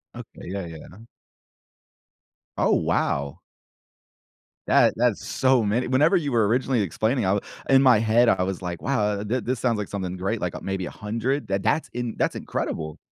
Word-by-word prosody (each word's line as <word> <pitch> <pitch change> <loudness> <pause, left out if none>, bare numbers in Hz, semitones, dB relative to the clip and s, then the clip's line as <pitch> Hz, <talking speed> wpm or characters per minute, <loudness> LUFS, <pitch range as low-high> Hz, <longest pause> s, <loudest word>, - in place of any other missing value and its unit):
Okay, - - -11
yeah, 95 -1 -4
yeah. 85 +6 -11 1.5
Oh, - - +2
wow. 70 0 -1 1.3
That - - +4
that's - - +1
so 130 -2 +2
many 110 +5 0
whenever 145 +9 +4
you 145 -5 -2
were 115 -4 +3
originally 125 +1 +1
explaining, 110 - 0
I 95 +2 +2 0.3
in 135 0 +6
my 125 -5 +6
head, 115 +2 +4
I - - +2
was 95 0 -4
like, 90 -1 -5
"Wow, 135 -4 0 0.2
uh, - - -4
thi 115 +5 -1
this 125 +1 -2
sounds 120 -3 +1
like 105 -2 -3
something 95 -2 -4
great, 100 +4 -2
like, 90 -1 -3
uh, - - -5
maybe 95 -2 -3
100?" 115 +5 -3
Th 95 0 -1
that's 155 +10 0
in 120 -2 -4
that's - - 0
incredible. 80 -1 -4
110 Hz, 175 wpm, -24 LUFS, 95-125 Hz, 1.5 s, in